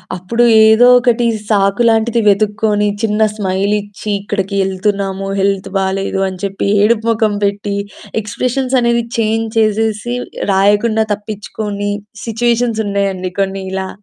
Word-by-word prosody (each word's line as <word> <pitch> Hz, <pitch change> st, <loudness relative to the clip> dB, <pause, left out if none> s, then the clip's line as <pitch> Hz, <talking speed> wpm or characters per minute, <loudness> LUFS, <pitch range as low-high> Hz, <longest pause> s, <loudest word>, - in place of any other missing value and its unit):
అప్పుడు 185 Hz, +7 st, -1 dB, 0.2 s
ఏదో 220 Hz, +3 st, +6 dB
ఒకటి 240 Hz, -1 st, +1 dB, 0.2 s
సాకులాంటిది 220 Hz, +3 st, +2 dB
వెతుక్కొని 210 Hz, +1 st, +2 dB
చిన్న 215 Hz, -1 st, 0 dB
స్మైలిచ్చి, 205 Hz, +1 st, -2 dB
ఇక్కడికి 200 Hz, -1 st, -3 dB
ఎళ్తున్నాము. 195 Hz, 0 st, -2 dB
హెల్త్ 195 Hz, 0 st, 0 dB
బాలేదు 195 Hz, 0 st, -1 dB
అని 185 Hz, -1 st, -7 dB
చెప్పి 195 Hz, 0 st, -2 dB, 0.2 s
ఏడుపు 225 Hz, +1 st, +2 dB
మొఖం 220 Hz, -2 st, +1 dB
పెట్టి, 200 Hz, 0 st, -1 dB, 0.5 s
ఎక్స్‌ప్రెషన్స్ 255 Hz, +5 st, -2 dB
అనేవి 235 Hz, 0 st, +1 dB
చేంజ్ 225 Hz, 0 st, 0 dB
చేసేసి, 220 Hz, +2 st, 0 dB, 0.4 s
రాయకుండా 210 Hz, +3 st, +2 dB
తప్పిచ్చుకొని 205 Hz, 0 st, -5 dB, 0.3 s
సిచ్యువేషన్స్ 235 Hz, 0 st, 0 dB
ఉన్నాయండి 195 Hz, -2 st, -2 dB
కొన్ని 195 Hz, 0 st, -2 dB
ఇలా. 190 Hz, 0 st, -3 dB
210 Hz, 110 wpm, -15 LUFS, 195-225 Hz, 0.5 s, ఏదో